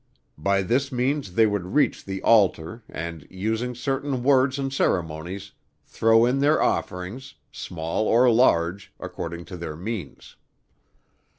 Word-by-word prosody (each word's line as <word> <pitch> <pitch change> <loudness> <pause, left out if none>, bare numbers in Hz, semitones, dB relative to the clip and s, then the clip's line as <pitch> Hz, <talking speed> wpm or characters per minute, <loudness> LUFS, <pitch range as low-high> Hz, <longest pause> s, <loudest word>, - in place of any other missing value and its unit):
By 100 +4 +1
this 130 +7 0
means 130 -5 -1
they 115 - +5
would 105 0 -2
reach 150 - +2
the 95 0 -5
altar 100 -2 +3
and, 80 -1 -6
using 110 +6 -2
certain 135 +1 -2
words 130 0 +3
and 135 -1 -3
ceremonies, 90 - -2 0.3
throw 115 +1 +3
in 125 +3 +1
their 145 +3 +3
offerings, 100 +10 -2 0.2
small 85 +5 -3
or 120 +3 +5
large, 95 -5 +2
according 85 0 -6
to 90 - -8
their 80 -3 -6
means. 95 -3 -7
110 Hz, 130 wpm, -24 LUFS, 90-130 Hz, 0.3 s, they